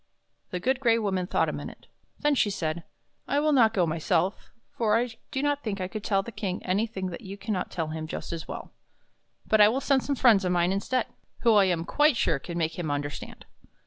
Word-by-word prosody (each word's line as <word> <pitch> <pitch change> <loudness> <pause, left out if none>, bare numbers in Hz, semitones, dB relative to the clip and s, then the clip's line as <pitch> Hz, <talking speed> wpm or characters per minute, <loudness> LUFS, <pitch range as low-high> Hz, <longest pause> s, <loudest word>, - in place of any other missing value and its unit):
The 180 - -3
Good 255 +6 +1
Gray 230 -3 +3
Woman 190 -5 -1
thought - - +1
a - - -1
minute. - - -8 0.4
Then 295 0 +3
she 245 -6 +2
said: 170 -4 -3 0.2
" - - -45
I 285 - +1
will 305 +1 +2
not 240 -6 +5
go 190 -6 +2
myself, 165 +3 0 0.3
for 220 -1 +2
I 240 +1 -1 0.2
do 265 - -2
not 290 0 +1
think 210 -3 -3
I 185 - -2
could 210 +2 -6
tell 195 -2 +1
the 235 - -8
King 200 -3 -4
anything 190 -1 -1
that 170 - -7
you 200 -2 -8
can 210 +2 -3
not 185 - -2
tell 160 -3 -3
him 155 0 -5
just 160 - -5
as 165 -1 -5
well. - - -7 0.7
But 220 -1 +4
I 210 - +9
will 250 +4 0
send 275 -1 +2
some 285 - -1
friends 230 -7 +5
of 180 - 0
mine 175 0 +2
instead, 230 +6 0 0.4
who 230 -2 +5
I 205 -2 +6
am 170 -3 0
quite 295 - +3
sure 155 -9 +1
can 170 +4 -6
make 160 0 -1
him 165 -4 -2
understand. 145 0 -5
200 Hz, 235 wpm, -27 LUFS, 175-235 Hz, 0.7 s, I